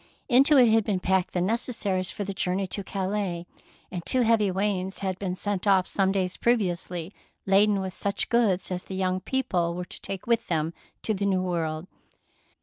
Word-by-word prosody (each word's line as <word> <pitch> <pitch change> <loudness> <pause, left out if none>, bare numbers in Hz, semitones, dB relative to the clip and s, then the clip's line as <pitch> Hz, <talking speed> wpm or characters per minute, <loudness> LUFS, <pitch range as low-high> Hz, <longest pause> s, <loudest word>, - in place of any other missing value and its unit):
Into 275 +3 +5
it 245 -3 +7
had 225 0 +4
been 200 -2 0
packed 190 0 +1
the 180 - +2
necessaries 200 -3 0
for 205 - -4
the 200 0 -4
journey 190 +1 -1
to 195 +2 -4
Calais, 190 -3 -2 0.5
and 180 -2 -4
two 255 +8 +1
heavy 225 -3 +3
wains 190 0 -1
had 185 -1 -2
been 185 -2 -2
sent 205 0 -2
off 190 -2 +5
some 195 -1 +1
days 185 -2 -1
previously, 180 -6 -1 0.3
laden 200 +1 +4
with 190 -1 -4
such 200 +1 0
goods 205 -7 +2
as 180 0 -3
the 190 - -6
young 185 -1 0
people 185 -7 -1
were 180 0 -4
to - - -9
take 195 -2 -6
with 235 -1 +1
them 160 -1 -1 0.3
to 220 - +1
the 200 0 -1
New 185 -2 +1
World. 165 -3 -2
190 Hz, 190 wpm, -26 LUFS, 180-210 Hz, 0.5 s, it